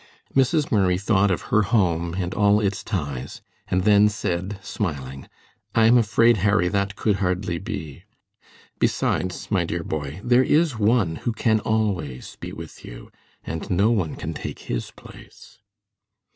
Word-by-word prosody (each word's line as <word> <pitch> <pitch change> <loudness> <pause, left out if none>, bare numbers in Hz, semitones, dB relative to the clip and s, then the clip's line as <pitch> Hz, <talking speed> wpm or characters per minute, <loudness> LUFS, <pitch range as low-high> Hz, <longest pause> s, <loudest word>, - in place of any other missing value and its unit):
Mrs. 135 +3 +2
Murray 95 -4 +3
thought 100 +1 +2
of 90 - -1
her 110 - +6
home 90 -6 +1
and 90 -1 -2
all 105 +1 +4
its 100 -2 -1
ties, 70 - -4 0.2
and 95 0 0
then 105 0 +5
said, 95 -1 -3
smiling: 70 -10 -4 0.5
"I 115 - +5
am 115 +2 +6
afraid, 115 0 +4
Harry, 100 -1 +2
that 100 0 -1
could 105 0 +1
hardly 90 -2 -1
be. 80 - -7 0.7
Besides, 90 +3 -1
my 95 -4 +2
dear 85 0 -3
boy, 75 +1 -4
there 120 +1 +4
is 150 -4 +2
One 105 -6 +2
who 120 - -2
can 110 0 +2
always 100 - -2
be - - -6
with - - -10
you, - - -11 0.3
and 80 0 -5
no 100 +5 +3
one 95 -9 0
can 80 - -5
take - - -7
His - - -4
place." - - -15
100 Hz, 155 wpm, -23 LUFS, 85-110 Hz, 0.7 s, her